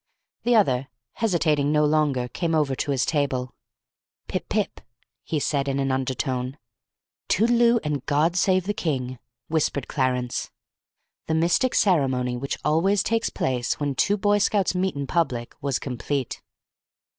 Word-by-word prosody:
The 240 0 +2
other, 135 - +3 0.2
hesitating 155 -9 +1
no 150 0 +3
longer, 145 -5 +1
came 165 +6 -1
over 150 -3 +2
to 140 - -3
his 135 -3 +1
table. 135 -5 -1 0.7
"Pip - - -4
pip!" - - -1 0.4
he 155 - -2
said, 140 -1 0
in 135 0 0
an 135 -1 0
undertone. 130 0 -2 0.7
"Toodleoo 235 +2 +4
and 150 -3 -2
God 155 +4 +2
save 185 0 +3
the 205 - -1
King!" 130 - -2 0.3
whispered 150 -4 0
Clarence. 125 -3 -1 0.8
The 160 - +1
mystic 175 +10 +2
ceremony 130 -9 +2
which 135 +3 -3
always 175 +6 +3
takes 230 0 0
place 125 -2 -1
when 145 -1 -1
two 205 +10 +2
Boy 205 +1 +2
Scouts 200 -1 +2
meet 185 -1 0
in 140 0 -3
public 130 -7 -1
was 140 -3 0
complete. 130 0 -3
145 Hz, 145 wpm, -24 LUFS, 130-180 Hz, 0.8 s, Toodleoo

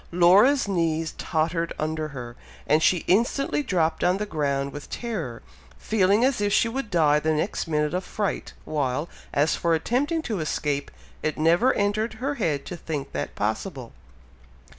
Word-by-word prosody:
Laura's 195 +10 +5
knees 165 -4 0
tottered 165 +1 -1
under 155 0 -2
her, 120 -5 -8 0.3
and 155 +2 +3
she 175 +1 +3
instantly 240 +9 +2
dropped 175 - 0
on 180 +2 +3
the 210 - -2
ground 140 -5 -1
with 145 - -8
terror, 175 - -4 0.3
feeling 205 - +2
as 265 -5 +1
if 205 0 +1
she 230 - +4
would 250 0 -4
die 155 -5 +4
the 160 +1 0
next 170 +3 -2
minute 150 -1 0
of 180 +1 -1
fright, 205 0 -3
while, 145 0 -1 0.2
as 150 +2 +2
for 170 -1 +1
attempting 280 - 0
to 220 - -2
escape, 145 -2 -2 0.3
it 155 - -2
never 170 +11 +4
entered 210 +3 0
her 260 +6 -2
head 160 - -1
to 180 - -6
think 150 -4 -5
that - - -4
possible. 120 - -3
170 Hz, 160 wpm, -25 LUFS, 150-210 Hz, 0.3 s, Laura's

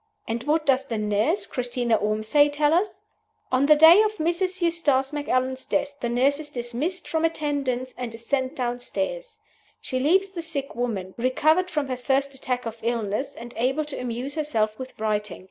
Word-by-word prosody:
And 230 +1 -2
what 310 +1 +1
does 270 -1 +2
the 230 - -2
nurse 210 - +1
(Christina 245 -2 -1
Ormsay) 215 +8 +2
tell 295 +1 +2
us? 375 +5 0 0.5
On 260 +2 +3
the 305 - +8
day 325 +6 +8
of 430 0 +1
Mrs. 365 +3 -1
Eustace 310 -6 +1
Macallan's 260 -3 -1
death, 285 0 -1
the 240 - -2
nurse 265 +4 +2
is 305 -1 -6
dismissed 255 +8 -3
from 320 0 -1
attendance, 280 -6 -1
and 235 -2 -4
is 230 +1 -11
sent 265 +2 -1
downstairs. 275 - -3 0.4
She 255 - -3
leaves 375 +8 +3
the 350 -3 -5
sick 295 -4 -3
woman, 210 -6 -3
recovered 310 +9 +2
from 300 -5 -1
her 255 -1 -3
first 275 +2 0
attack 250 -2 -3
of 230 0 -6
illness, 230 +3 -2
and 235 +1 -9
able 265 +6 0
to 295 - -5
amuse 250 +3 -4
herself 225 -8 -1
with 260 0 -8
writing. 210 -2 -1
265 Hz, 180 wpm, -25 LUFS, 240-310 Hz, 0.5 s, the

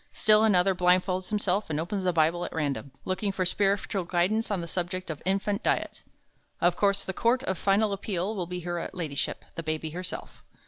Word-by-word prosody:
Still 215 0 +5
another 195 -3 +4
blindfolds 185 +1 +2
himself 205 -2 0
and 150 -1 -1
opens 185 +4 -2
the 180 - +2
Bible 165 +1 +2
at - - -5
random, 145 -3 -2 0.2
looking 195 +2 -1
for 190 -1 -1
spiritual 195 +1 +1
guidance 185 +6 +1
on 200 -3 0
the 170 - -5
subject 180 0 -3
of 150 - -7
infant 200 +1 +1
diet. - - -1 0.6
Of 175 0 +3
course 200 0 +2
the 190 - -3
Court 240 +6 +2
of 190 - -1
Final 200 +1 +3
Appeal 195 +1 -2
will 180 -4 -3
be 180 0 -5
Her 175 0 -3
Ladyship 160 -7 -3
The 165 - -4
Baby 155 0 -3
Herself. 180 +3 -7
185 Hz, 190 wpm, -28 LUFS, 175-200 Hz, 0.6 s, Still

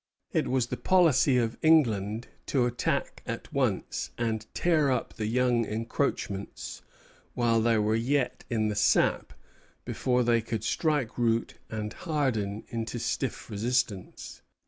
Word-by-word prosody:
It - - +1
was 130 -2 +1
the - - -5
policy 155 -8 +4
of 115 -2 0
England 115 -8 +3 0.2
to 130 -3 +2
attack 120 0 -1
at - - -5
once, - - -1
and 110 -2 -2
tear 160 -5 +3
up 125 - -1
the 110 -2 -3
young 120 0 +2
encroachments 110 -2 -3 0.5
while 115 -2 +2
they 115 0 +3
were 105 0 +2
yet 125 +2 0
in 110 -2 +1
the 105 - -2
sap, 105 - +2 0.5
before 125 -1 +1
they 115 -1 +3
could 110 -1 -4
strike 145 -8 0
root 115 -1 0
and 110 0 -4
harden 125 - -1
into 115 +1 -3
stiff - - -2
resistance. 110 -2 -2
115 Hz, 135 wpm, -28 LUFS, 110-130 Hz, 0.5 s, policy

